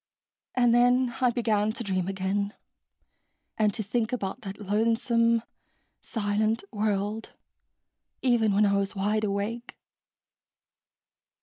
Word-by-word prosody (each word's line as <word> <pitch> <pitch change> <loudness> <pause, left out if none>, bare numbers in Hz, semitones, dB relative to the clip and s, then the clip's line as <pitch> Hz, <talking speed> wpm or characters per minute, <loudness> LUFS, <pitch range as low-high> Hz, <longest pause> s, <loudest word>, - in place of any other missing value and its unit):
And 245 -2 +4
then 245 +1 +4
I 250 - +5
began 220 -3 +1
to 235 - -5
dream 185 -3 -1
again, 195 +1 -2 1.0
and 215 -1 +2
to 220 - -3
think 225 +3 -1
about 200 -6 -3
that 195 -1 -7
lonesome 230 +2 +2 0.6
silent 215 0 -1
world 210 0 -2 0.9
even 235 -4 +3
when 205 +2 +4
I 200 - +2
was 200 +1 -2
wide 210 +2 0
awake." 210 +4 -3
215 Hz, 110 wpm, -27 LUFS, 200-230 Hz, 1.0 s, I